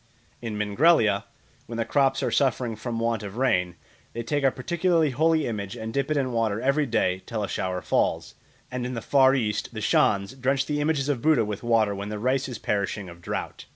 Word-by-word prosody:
In 115 -3 -4
Mingrelia, 105 0 +3 0.4
when 115 - -6
the 115 - 0
crops 135 -2 +2
are - - 0
suffering 125 -4 +1
from 115 +2 -4
want 115 -1 0
of 100 +1 -8
rain, 90 -9 +1 0.4
they 115 - -4
take 145 +4 -1
a 135 - +5
particularly 165 +3 +1
holy 160 +3 +2
image 100 -4 -4
and 110 0 -6
dip 140 +1 -1
it 155 - +1
in 130 -2 0
water 115 -3 0
every 140 +4 +1
day 95 -5 0
till 110 -3 -3
a - - -2
shower 90 -1 -3
falls; - - 0 0.4
and 125 -1 -3
in 125 +1 -4
the 115 - -4
Far 135 -1 +4
East 110 -6 -2
the - - -3
Shans 100 +3 +2
drench 135 +1 0
the 150 -1 -1
images 145 -2 0
of 140 -5 -1
Buddha 150 -7 +3
with 105 -1 -5
water 115 -3 +2
when 100 +1 -5
the 105 - -4
rice 130 +4 0
is 125 - -5
perishing 100 -2 -2
of 85 0 -13
drought. - - -5
120 Hz, 215 wpm, -25 LUFS, 105-135 Hz, 0.4 s, a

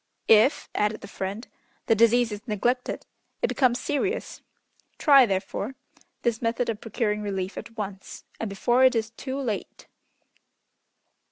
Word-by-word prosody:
"If," 225 +6 +5
added 210 +1 0
the - - -9
friend, 200 +4 -5 0.4
"the 225 - +4
disease 230 +1 +4
is 210 +4 -7
neglected 240 +4 -1 0.4
it - - +4
becomes 250 -2 +2
serious; 380 - -2 0.6
try 275 -4 +6
therefore, 200 +5 -3 0.5
this 235 -2 0
method 235 +1 0
of 220 -2 -3
procuring 210 -2 -1
relief 195 -2 -3
at 230 - -9
once, 195 -2 -6 0.2
and 225 - -3
before 240 +6 +2
it 260 -1 +6
is 220 -1 -1
too 260 +4 -5
late." 230 -7 -4
225 Hz, 140 wpm, -26 LUFS, 210-250 Hz, 0.6 s, try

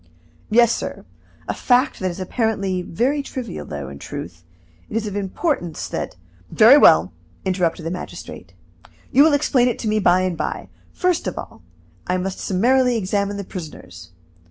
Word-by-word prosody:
"Yes, 235 +1 +5
sir; - - -5 0.4
a - - -1
fact 255 +3 +2
that 185 - -1
is 175 - -7
apparently 195 -2 -1
very 250 - 0
trivial, 255 -7 -6
though, 70 -2 -6
in 70 +1 -9
truth, 85 +3 -8 0.5
it 220 - -2
is 225 - -2
of 205 -2 -5
importance 195 - -2
that - - -4 0.2
" 90 +1 -30
"Very 230 +6 +10
well!" 295 - +6 0.3
interrupted 180 -3 0
the 165 - -2
magistrate. 180 - -8 0.6
"You 270 - +5
will 310 0 +6
explain 275 -3 +3
it 245 - 0
to - - -4
me 215 0 +2
by 185 -2 +4
and 185 -2 -1
by. - - -4 0.2
First 360 - 0
of 185 - -4
all, 110 - -8 0.5
I 180 - +1
must 185 +1 -3
summarily 245 +5 +2
examine 200 0 -1
the 200 - -4
prisoners. 95 - -9
195 Hz, 170 wpm, -21 LUFS, 175-245 Hz, 0.6 s, Very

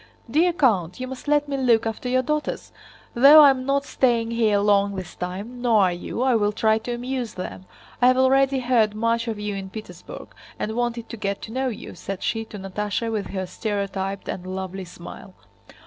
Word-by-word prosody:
"Dear 320 +9 +3
count, 210 - +1
you 255 - -3
must 260 +2 -9
let 295 0 +2
me 280 -1 -2
look 235 -4 +3
after 225 +3 -3
your 255 +1 +2
daughters! 300 +3 -3 0.4
Though 280 +6 +9
I 280 - +8
am 260 -1 -4
not 280 0 +1
staying 235 -3 +1
here 225 -3 +2
long 200 -1 +2
this 185 -3 -6
time—nor 220 +6 -1
are 185 -3 +4
you—I 245 +9 -1
will 210 -2 +2
try 220 +1 +2
to 240 +2 -4
amuse 245 -1 -4
them. 185 0 -7 0.3
I 245 - +6
have 255 0 +4
already 270 0 +3
heard 230 -4 +2
much 230 +1 0
of 225 -2 -3
you 210 0 -3
in 195 -1 -6
Petersburg 220 - -10 0.3
and 220 +1 -3
wanted 240 -1 -2
to 230 - -7
get 200 -1 -2
to 220 - -7
know 260 +2 -1
you," 235 - -6
said 195 -1 -6
she 225 -1 -1
to 215 - -10
Natásha 210 +4 -3
with 210 -3 -2
her 190 -1 -4
stereotyped 195 0 -3
and 185 0 -5
lovely 190 0 -5
smile. 175 +2 -11
225 Hz, 195 wpm, -23 LUFS, 200-255 Hz, 0.4 s, Though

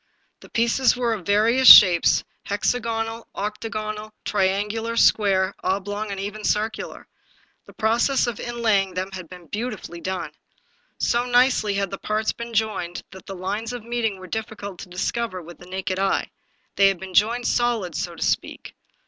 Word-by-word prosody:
The - - -15
pieces 235 +2 +2
were 240 -2 0
of 195 -6 -7
various 230 +6 +7
shapes 180 -5 +8
— - - -46
hexagonal, 225 +2 -2
octagonal, 215 +1 -5
triangular, 210 +4 -1
square, 195 -4 +3
oblong, 205 +2 -2
and 200 -1 -5
even 205 +2 -5
circular. 215 +2 -2 0.6
The - - -14
process 235 +5 +2
of 240 -4 -4
inlay 235 -4 +1
ing 190 -1 -7
them 185 +1 -3
had 185 -4 -8
been 180 -1 -12
beautifully 205 -3 -6
done. 180 -4 -4 0.7
So 240 +1 +1
nicely 245 -4 +3
had 200 0 -1
the 195 - -6
parts 215 +1 -1
been 235 0 -8
joined 205 -5 -1
that 190 -1 -13
the 195 - -6
lines 205 +6 -4
of 245 -3 -6
meeting 230 -3 -2
were 185 - -11
difficult 205 -2 -6
to 185 - -9
discover 185 +2 -2
with 175 0 -12
the 175 - -14
naked 185 0 -3
eye; 195 0 0 0.5
they 200 - +6
had 195 -2 0
been 190 -1 -9
joined 235 +5 +2
solid, 235 -9 0
so - - -4
to - - -4
speak. - - -2
210 Hz, 165 wpm, -23 LUFS, 190-230 Hz, 0.7 s, shapes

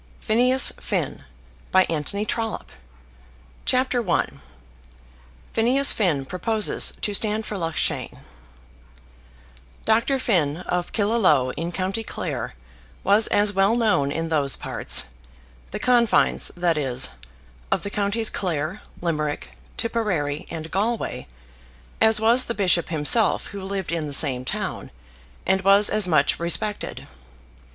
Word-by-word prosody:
C. 215 - -2
LXXVI. 255 +3 +2 0.5
Conclusion 185 +2 +1
VOLUME 225 0 -2
I - - -11 1.0
CHAPTER 255 -4 0
I 170 - +2 1.3
Phineas 260 +5 +4
Finn 160 -10 0
Proposes 210 +7 0
to 205 - -1
Stand 215 +1 0
for 210 - -5
Loughshane 165 -4 -3 1.7
Dr. 230 +5 +2
Finn, 165 - +1
of 180 0 -3
Killaloe, 200 - +2
in 170 +2 -4
county 190 +5 -3
Clare, 65 - -5 0.5
was 205 +3 +4
as 205 0 +2
well 195 +3 +3
known 210 -12 +1
in 165 +2 -3
those 145 -4 +2
parts, - - -1 0.6
the - - -5
confines, 240 -3 +2
that 170 -3 +1
is, 130 -3 +1 0.6
of - - 0
the 200 - -5
counties 210 +2 0
Clare, 170 +1 -3 0.2
Limerick, 150 - -2 0.3
Tipperary, 180 -11 -2
and 160 -1 -7
Galway, 220 +5 -2 0.7
as 220 -1 +6
was 235 +4 +4
the 235 - -3
bishop 180 -4 +2
himself 165 +8 +3
who 200 - -8
lived 190 -2 -4
in 165 -3 -2
the 145 - -4
same 130 -3 +3
town, - - -4 0.6
and 190 - +2
was 200 +2 +5
as 210 -3 +2
much 150 -5 +2
respected. 175 +5 -2
195 Hz, 120 wpm, -23 LUFS, 160-220 Hz, 1.7 s, as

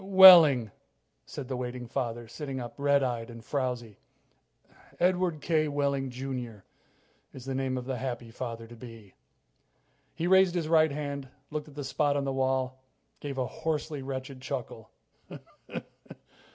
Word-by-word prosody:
"Wehling," 175 - +9 0.6
said 135 - -7
the 130 - -3
waiting 125 0 -4
father, 120 0 -3
sitting 135 +2 -5
up, 120 -2 -6
red 140 0 +3
eyed 120 -2 -2
and 115 -1 -11
frowzy. 125 -6 -3 1.0
"Edward 180 -3 +1
K. 155 -1 +2
Wehling, 140 -2 0
Jr., 125 -5 -6 0.7
is 130 -2 -10
the 135 - -3
name 130 -1 -1
of 125 - -5
the 130 -1 -3
happy 120 -3 -4
father 115 -1 -6
to 120 +1 -12
be." 115 -4 -12 1.0
He 165 - -2
raised 190 0 +5
his 165 -3 -1
right 160 -1 +5
hand, 140 -2 -4 0.2
looked 150 0 -4
at 145 - -16
a 145 - -3
spot 145 +1 +1
on 140 - 0
the 135 -1 -1
wall, 130 0 0 0.4
gave 140 -2 -5
a 130 - 0
hoarsely 155 0 -3
wretched 130 0 -6
chuckle. 125 -5 -5
135 Hz, 150 wpm, -29 LUFS, 125-145 Hz, 1.0 s, Wehling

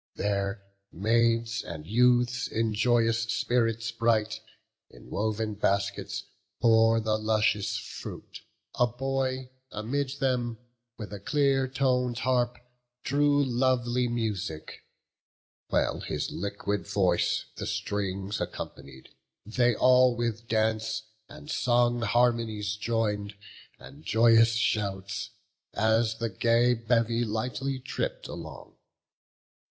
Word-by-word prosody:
There 100 0 -1 0.3
maids 115 +3 +1
and 80 -3 -8
youths, 125 +4 +3
in 110 -1 -1
joyous 115 0 +2
spirits 115 0 0
bright, 110 -1 +1 0.5
In - - -16
woven 110 +1 -1
baskets 100 -1 -1 0.4
bore 115 -1 +5
the 110 -1 0
luscious 110 -1 +1
fruit. - - -8 0.4
A 120 - +5
boy, 130 +1 -2 0.2
amid 135 +6 -3
them, 125 -4 0 0.4
from 105 -3 -7
a 100 - -6
clear 135 +3 +2
ton'd 125 -2 0
harp 125 0 +1 0.5
Drew 145 +1 +3
lovely 125 -1 +1
music; 105 -9 -3 0.9
well - - +1
his - - -3
liquid 100 0 -3
voice 95 -4 +1
The - - -4
strings 100 0 -3
accompanied; 65 -1 -7 0.4
they 120 +2 +2
all 125 0 +5
with 115 -1 -3
dance 110 0 0 0.3
And 150 0 -12
song 120 -4 +2
harmonious 115 -3 +1
join'd, 105 -2 -1 0.4
and 70 +4 -14
joyous 115 +3 +5
shouts, 100 -3 -1 0.5
As 110 +1 +2
the 115 0 -3
gay 115 +5 +3
bevy 115 0 +1
lightly 125 +5 -2
tripp'd - - -4
along. - - -9
115 Hz, 105 wpm, -28 LUFS, 105-125 Hz, 0.9 s, bore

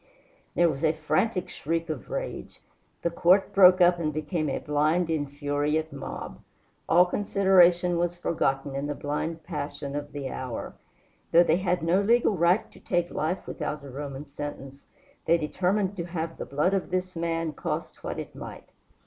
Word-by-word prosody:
There 175 - +5
was 150 -2 -2
a 155 -1 +4
frantic 180 +6 0
shriek 165 +2 -3
of 155 - -5
rage. - - -5 0.4
The 170 - +1
court 185 +4 +3
broke 185 -1 +7
up 175 0 +5
and 155 -2 0
became 155 +1 -2
a - - -1
blind, 155 +4 +1
infuriate 145 +1 -1
mob. 140 - -7 0.5
All 175 +2 +6
consideration 180 -3 +3
was 175 0 0
forgotten 135 -5 -1
in 140 +1 -2
the 145 - -3
blind 155 +3 -3
passion 145 -3 -5
of 145 0 -4
the 145 -2 -5
hour. 130 -3 -5 0.6
Though 170 +1 +7
they 170 -1 +3
had 180 -2 0
no 175 +4 +3
legal 225 0 +3
right 175 +4 +2
to - - -16
take 175 -1 -1
life 165 +5 -2
without 150 -2 -4
a 140 - -9
Roman 140 +1 -6
sentence, 140 -1 -8 0.4
they 170 - +4
determined 190 +5 0
to 170 - -3
have 165 -2 -4
the - - -4
blood 150 +7 +1
of 195 -2 -1
this 185 0 -2
man, 165 -1 -1
cost - - -4
what - - -4
it - - -6
might. - - -9
165 Hz, 170 wpm, -27 LUFS, 145-180 Hz, 0.6 s, broke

